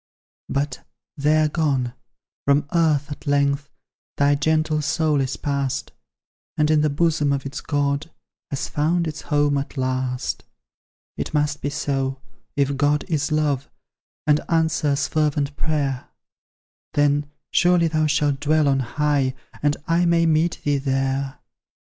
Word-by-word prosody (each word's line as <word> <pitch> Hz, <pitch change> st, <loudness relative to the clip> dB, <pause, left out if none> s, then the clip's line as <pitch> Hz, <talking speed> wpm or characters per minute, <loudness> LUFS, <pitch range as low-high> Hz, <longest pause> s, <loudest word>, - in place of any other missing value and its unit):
But 140 Hz, -1 st, -2 dB, 0.3 s
they 150 Hz, +1 st, +3 dB
are 155 Hz, -, +4 dB
gone; 140 Hz, -6 st, 0 dB, 0.5 s
from 140 Hz, +1 st, +4 dB
earth 155 Hz, -3 st, +2 dB
at 145 Hz, -, -8 dB
length 140 Hz, 0 st, +1 dB, 0.5 s
Thy 140 Hz, 0 st, +4 dB
gentle 155 Hz, +1 st, +1 dB
soul 150 Hz, 0 st, +1 dB
is 130 Hz, 0 st, -2 dB
pass'd, 140 Hz, -2 st, -2 dB, 0.7 s
And 150 Hz, 0 st, +3 dB
in 155 Hz, -1 st, +4 dB
the 150 Hz, -, +2 dB
bosom 150 Hz, -1 st, +1 dB
of 140 Hz, -1 st, -1 dB
its 140 Hz, +2 st, -5 dB
God 145 Hz, +1 st, -1 dB, 0.4 s
Has 140 Hz, -, -3 dB
found 165 Hz, +3 st, +1 dB
its 155 Hz, -1 st, -5 dB
home 145 Hz, -1 st, +2 dB
at 140 Hz, +1 st, -7 dB
last. 130 Hz, 0 st, -2 dB, 0.7 s
It -, -, -3 dB
must 150 Hz, 0 st, +1 dB
be 145 Hz, -, -1 dB
so, 135 Hz, -2 st, -2 dB, 0.4 s
if 140 Hz, -1 st, +1 dB
God 145 Hz, +1 st, +2 dB
is 150 Hz, -2 st, 0 dB
love, 145 Hz, -3 st, 0 dB, 0.6 s
And 150 Hz, 0 st, +3 dB
answers 160 Hz, -4 st, +1 dB
fervent 145 Hz, -2 st, 0 dB
prayer; 140 Hz, -5 st, -1 dB, 0.9 s
Then 145 Hz, 0 st, +2 dB, 0.2 s
surely 175 Hz, -1 st, +4 dB
thou 155 Hz, -1 st, +1 dB
shalt 150 Hz, -2 st, +1 dB
dwell 155 Hz, +1 st, +2 dB
on 135 Hz, -1 st, +3 dB
high, 140 Hz, +1 st, 0 dB, 0.3 s
And 145 Hz, 0 st, +2 dB
I 170 Hz, +1 st, +3 dB
may 170 Hz, 0 st, +3 dB
meet 160 Hz, +1 st, +2 dB
thee 145 Hz, -1 st, +1 dB
there. 135 Hz, 0 st, -1 dB
145 Hz, 140 wpm, -23 LUFS, 140-155 Hz, 0.9 s, are